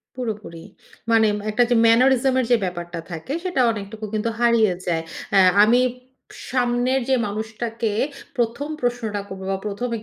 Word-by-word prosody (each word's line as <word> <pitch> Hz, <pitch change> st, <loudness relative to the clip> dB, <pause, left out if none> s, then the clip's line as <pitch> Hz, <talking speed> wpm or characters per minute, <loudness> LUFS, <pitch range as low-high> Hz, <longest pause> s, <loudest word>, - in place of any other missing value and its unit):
পুরোপুরি। 215 Hz, -8 st, -5 dB, 0.5 s
মানে 225 Hz, -1 st, +5 dB, 0.2 s
একটা 215 Hz, +3 st, +3 dB
যে 245 Hz, -, +3 dB
ম্যানারিজম 255 Hz, +3 st, +4 dB
এর 250 Hz, -, +1 dB
যে 240 Hz, -, +6 dB
ব্যাপারটা 175 Hz, -1 st, -5 dB
থাকে, 165 Hz, -, -5 dB
সেটা 360 Hz, -8 st, 0 dB
অনেকটুকু 215 Hz, +1 st, -6 dB
কিন্তু 215 Hz, +2 st, 0 dB
হারিয়ে 230 Hz, -5 st, +3 dB
যায়। 165 Hz, -2 st, 0 dB, 0.3 s
অ্যা 195 Hz, -, +6 dB, 0.2 s
আমি 240 Hz, +3 st, +4 dB, 0.7 s
সামনের 250 Hz, +1 st, +1 dB
যে 260 Hz, -, +4 dB
মানুষটাকে, 220 Hz, +1 st, -3 dB, 0.5 s
১ম 240 Hz, +5 st, -1 dB
প্রশ্নটা 230 Hz, -4 st, -2 dB
করব 190 Hz, -1 st, -8 dB
বা 195 Hz, -, 0 dB
১ম 210 Hz, +5 st, -3 dB
225 Hz, 145 wpm, -22 LUFS, 205-245 Hz, 0.7 s, যে